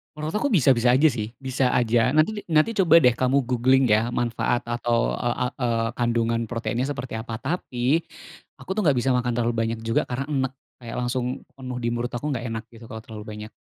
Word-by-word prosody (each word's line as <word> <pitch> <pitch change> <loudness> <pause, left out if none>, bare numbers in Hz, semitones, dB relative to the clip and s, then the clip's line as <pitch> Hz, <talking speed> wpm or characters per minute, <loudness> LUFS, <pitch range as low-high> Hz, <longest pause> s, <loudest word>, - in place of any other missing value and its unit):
Menurut 155 +3 -4
aku 270 +5 0
bisa-bisa 130 - +4
aja 135 +6 +5
sih 115 -6 -2
bisa 130 -1 0
aja 120 0 +2
nanti 170 +9 +1
nanti 155 +9 +3
coba 170 -5 +6
deh 125 -5 +4
kamu 130 +1 +1
googling 130 +1 +3
ya 110 +2 +2
manfaat 120 0 0
atau, 120 0 0
eee, 120 0 -1
a - - +1
eee, 115 -3 0
kandungan 115 -1 0
proteinnya 115 +1 -2
seperti 135 -4 -4
apa 110 0 -5
tapi, 135 +1 -1 0.6
aku - - -14
tuh 215 - 0
nggak 145 -6 +3
bisa 130 +1 +1
makan 125 0 0
terlalu 120 0 0
banyak 115 0 -1
juga 115 - +2
karena 130 +3 -3
enek 135 -3 -1 0.3
kayak 115 - -6
langsung 125 0 -1 0.3
penuh 130 -2 -6
di 120 - -2
mulut 120 +1 -3
aku 120 +5 -4
nggak 130 -5 -2
enak 115 0 -4
gitu 115 0 -12
kalau 110 - -6
terlalu 110 -2 -9
banyak. 105 +1 -8
125 Hz, 200 wpm, -24 LUFS, 115-135 Hz, 0.6 s, coba